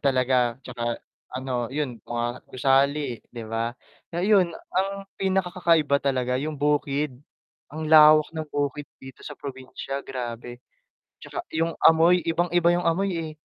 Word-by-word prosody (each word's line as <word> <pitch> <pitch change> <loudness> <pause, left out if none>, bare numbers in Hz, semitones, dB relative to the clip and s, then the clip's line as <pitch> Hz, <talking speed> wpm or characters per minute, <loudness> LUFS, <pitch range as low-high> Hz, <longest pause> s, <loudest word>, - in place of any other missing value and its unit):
talaga 130 -3 +2
tsaka 120 -2 -3 0.4
ano, 125 -2 -3
yun, 140 -5 -2
mga 120 +1 -4
gusali, 135 -1 +1
'di 120 - -7
ba? 115 +1 -2 0.4
So 170 - -2
yun 190 -3 +3 0.2
ang 190 +1 +1 0.3
pinakakakaiba 180 -6 +2
talaga 130 -2 0
yung 155 +1 -4
bukid, 145 -1 0 0.6
ang 155 0 -4
lawak 155 -1 +7
ng 160 -1 -4
bukid 145 0 -2 0.2
dito 130 0 -12
sa - - -7
probinsya, 135 0 -6
grabe. 120 -1 -6 0.6
Tsaka - - -6
yung 165 +1 0
amoy 165 +2 +5
ibang 170 +1 0
iba 170 -1 +4
yung 175 - 0
amoy 195 +4 +1
eh. 165 -2 -4
145 Hz, 140 wpm, -25 LUFS, 125-165 Hz, 0.6 s, lawak